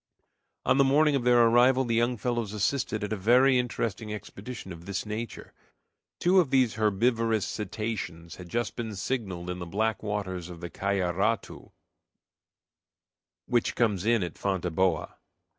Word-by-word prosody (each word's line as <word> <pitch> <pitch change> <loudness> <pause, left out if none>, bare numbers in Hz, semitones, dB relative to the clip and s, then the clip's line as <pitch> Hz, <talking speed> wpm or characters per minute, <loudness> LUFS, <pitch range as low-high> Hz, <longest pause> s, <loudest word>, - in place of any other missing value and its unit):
On 135 - +3
the - - +7
morning 145 +2 +4
of 125 -3 -1
their 120 -1 +6
arrival 125 +3 +4
the 115 - -1
young 120 +2 +1
fellows 115 -2 -2
assisted 110 0 -1
at 105 +1 -2
a - - 0
very 125 +6 +4
interesting 115 -3 -3
expedition 105 0 -7
of 85 +2 -12
this 100 +1 -3
nature. 110 +1 -6 0.7
Two 185 +2 +4
of 165 -7 +2
these 130 -4 +3
herbivorous 110 +1 +1
cetaceans 105 -6 -5
had 90 -1 -10
just 120 +6 -2
been 110 -3 -4
signaled 95 -5 -3
in 90 - -5
the 85 - -6
black 110 +4 -1
waters 95 -4 -4
of 85 -2 -9
the 85 0 -7
Cayaratu, 100 +2 -1 1.7
which 120 -2 0
comes 105 -6 +1
in 115 -2 +2
at 85 - -6
Fonteboa. 90 -3 0
110 Hz, 150 wpm, -28 LUFS, 95-120 Hz, 1.7 s, the